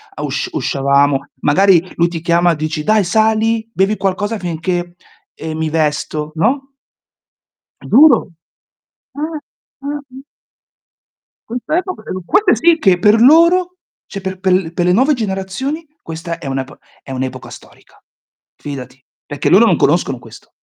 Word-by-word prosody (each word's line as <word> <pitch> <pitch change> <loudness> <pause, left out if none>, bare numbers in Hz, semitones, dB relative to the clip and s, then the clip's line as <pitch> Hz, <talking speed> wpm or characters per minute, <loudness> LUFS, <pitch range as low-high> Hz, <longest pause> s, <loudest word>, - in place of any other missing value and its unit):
A - - -6
usc 380 - -3
uscivamo. 140 - +1
Magari 180 +3 +4
lui 170 - +2
ti 165 -2 -6
chiama, 170 0 +2
dici: 155 0 -3
"Dai 215 +1 +3
sali, 220 +3 +1
bevi 200 +1 +1
qualcosa 205 +3 -2
finché, 175 +1 -3 0.4
ehm, 160 0 -6
mi 160 0 -1
vesto", 150 -1 -2
no? 270 - 0 1.1
Giuro. 260 - +5 0.9
Ah, 305 +1 -4 0.4
ah-ah. 280 -2 -7 1.2
Questa 250 +8 -2
epoca 370 0 -3
perchè - - -9
non 185 -1 -5
puoi, 385 - +2
questa 410 - +1
sì 335 -1 +5
che 190 - +3
per 210 +5 +4
loro, 345 +6 +5 0.3
cioè 200 - -7
per 190 -1 -6
per 190 -1 0
l 180 -3 +1
pe 175 - -1
le 180 - +2
nuove 265 +8 +3
generazioni 225 - -4 0.2
questa 165 +1 -6
è - - -8
un'ep 135 +1 -4 0.3
è 135 - -10
un' 130 0 -4
epoca 130 - -5
storica. - - -16 0.5
Fidati, 130 -3 -8 0.3
perché - - -2
loro - - +6
non - - +3
conoscono - - +1
questo. - - -15
190 Hz, 150 wpm, -16 LUFS, 160-260 Hz, 1.2 s, loro